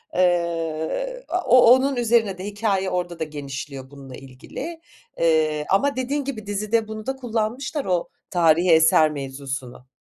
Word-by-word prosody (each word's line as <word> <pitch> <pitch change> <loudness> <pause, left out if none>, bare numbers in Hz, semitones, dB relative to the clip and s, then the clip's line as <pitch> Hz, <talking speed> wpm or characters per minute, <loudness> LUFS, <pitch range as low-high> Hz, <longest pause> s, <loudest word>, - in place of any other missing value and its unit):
Eee, 175 - -1
a 360 - 0
o 255 - +6 0.2
onun 270 +1 0
üzerine 225 -5 +1
de 185 - -7
hikâye 205 -2 -1
orada 175 -1 -3
da 160 - -1
genişliyor 140 -2 -7
bununla 135 -2 -11
ilgili, 255 - -9 0.4
eee, 155 -2 +2
ama 275 +8 +2
dediğin 275 +3 -2
gibi 225 -7 -5
dizide 215 +2 0
bunu 215 0 -7
da 265 0 -2
kullanmışlar 245 +4 -3
o 180 -2 -1 0.2
tarihi 170 0 +3
eser 160 -1 +5
mevzusunu. 135 -2 -7
180 Hz, 145 wpm, -23 LUFS, 155-235 Hz, 0.4 s, o